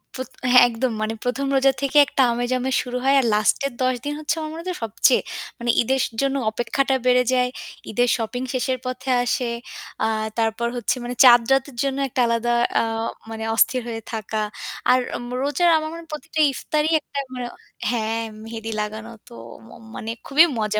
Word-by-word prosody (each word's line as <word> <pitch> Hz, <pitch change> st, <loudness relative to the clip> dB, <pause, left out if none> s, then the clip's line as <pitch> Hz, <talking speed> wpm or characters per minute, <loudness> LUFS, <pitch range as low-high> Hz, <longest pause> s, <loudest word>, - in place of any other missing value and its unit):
পোত 260 Hz, 0 st, -5 dB, 0.2 s
হ্যাঁ, 250 Hz, -, +8 dB
একদম 240 Hz, +2 st, -1 dB
মানে 215 Hz, +1 st, -1 dB
১ম 255 Hz, +3 st, -1 dB
রোজা 270 Hz, 0 st, +5 dB
থেকে 275 Hz, +1 st, 0 dB
একটা 270 Hz, -, 0 dB
আমেজ, 240 Hz, +1 st, -2 dB
আমেজ 260 Hz, +1 st, -1 dB
শুরু 250 Hz, 0 st, -4 dB
হয়। 275 Hz, +1 st, +4 dB
আর 265 Hz, -, +1 dB
last 210 Hz, +1 st, +3 dB
এর 260 Hz, -, -9 dB
১০ 255 Hz, 0 st, +2 dB
দিন 290 Hz, -, -2 dB
হচ্ছে 310 Hz, +1 st, -1 dB
আমার 310 Hz, -1 st, -4 dB
মনে 325 Hz, -, -7 dB
হয় 365 Hz, -, -10 dB
যে 365 Hz, -, -3 dB
সবচেয়ে 220 Hz, -, +3 dB, 0.4 s
মানে 240 Hz, -, -3 dB
ঈদের 265 Hz, +2 st, +1 dB, 0.2 s
জন্য 275 Hz, 0 st, 0 dB, 0.2 s
অপেক্ষাটা 265 Hz, +4 st, 0 dB
বেড়ে 250 Hz, 0 st, +5 dB
যায়। 250 Hz, 0 st, +2 dB, 0.4 s
ঈদের 245 Hz, +3 st, +2 dB
shopping 240 Hz, +3 st, -3 dB
শেষের 255 Hz, 0 st, 0 dB
পথে 255 Hz, +1 st, -4 dB
আসে। 245 Hz, 0 st, 0 dB, 0.6 s
আ -, -, +2 dB, 0.3 s
তারপর 225 Hz, +1 st, 0 dB
হচ্ছে 240 Hz, -, 0 dB
মানে 245 Hz, +1 st, -4 dB
চাঁদ 240 Hz, -1 st, +9 dB
রাতের 270 Hz, 0 st, +1 dB
জন্য 275 Hz, -1 st, -1 dB
একটা 250 Hz, -, 0 dB
আলাদা 235 Hz, +1 st, 0 dB, 0.3 s
আ -, -, +3 dB, 0.5 s
মানে 220 Hz, 0 st, -5 dB
অস্থির 250 Hz, +3 st, +3 dB
হয়ে 225 Hz, -1 st, -5 dB
থাকা। 220 Hz, 0 st, -3 dB, 0.5 s
আর 255 Hz, -, +5 dB, 0.3 s
ম -, -, -8 dB
রোজার 340 Hz, +5 st, +2 dB
আমার 310 Hz, 0 st, -3 dB
মনে 335 Hz, -, -7 dB
হয় 330 Hz, -, -21 dB
প্রতিটা 315 Hz, +1 st, -5 dB
ইফতারই 305 Hz, +3 st, -1 dB
একটা 280 Hz, -, -6 dB, 0.2 s
মানে 250 Hz, -1 st, -4 dB, 0.4 s
হ্যাঁ, 225 Hz, -1 st, -1 dB, 0.2 s
মেহেদি 225 Hz, 0 st, -6 dB
লাগানো 220 Hz, +2 st, -6 dB, 0.2 s
তো -, -, -14 dB, 0.3 s
ম -, -, -17 dB, 0.3 s
মানে 225 Hz, -, -4 dB, 0.2 s
খুবই 310 Hz, +5 st, +6 dB
মজা। 215 Hz, 0 st, 0 dB
250 Hz, 190 wpm, -22 LUFS, 230-270 Hz, 0.6 s, চাঁদ